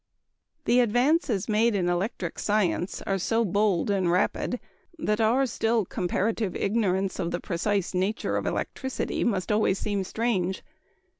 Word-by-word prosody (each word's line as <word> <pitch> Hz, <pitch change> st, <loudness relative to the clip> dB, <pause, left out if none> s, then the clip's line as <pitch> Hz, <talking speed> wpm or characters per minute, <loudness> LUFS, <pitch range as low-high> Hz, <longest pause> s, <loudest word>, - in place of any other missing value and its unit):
_ -, -, -48 dB
The 245 Hz, -, +4 dB
advances 245 Hz, -, +2 dB
made 220 Hz, +1 st, +2 dB
in 180 Hz, -3 st, +1 dB
electric 175 Hz, -1 st, -2 dB
science 205 Hz, -3 st, 0 dB
are 195 Hz, 0 st, -1 dB
so 225 Hz, +5 st, +1 dB
bold 200 Hz, 0 st, +1 dB
and 190 Hz, -3 st, +1 dB
rapid 210 Hz, +7 st, 0 dB, 0.4 s
that 210 Hz, -7 st, 0 dB
our 240 Hz, +5 st, +3 dB
still 225 Hz, -3 st, 0 dB
comparative 195 Hz, +3 st, -1 dB
ignorance 195 Hz, -3 st, 0 dB
of 170 Hz, -, -1 dB
the 175 Hz, -, -2 dB
precise 195 Hz, +2 st, -1 dB
nature 190 Hz, +4 st, -1 dB
of -, -, -1 dB
electricity 265 Hz, -1 st, -2 dB
must 200 Hz, -4 st, 0 dB
always 210 Hz, -2 st, +2 dB
seem 200 Hz, -1 st, -1 dB
strange. 190 Hz, -3 st, -1 dB
205 Hz, 145 wpm, -27 LUFS, 185-230 Hz, 0.4 s, The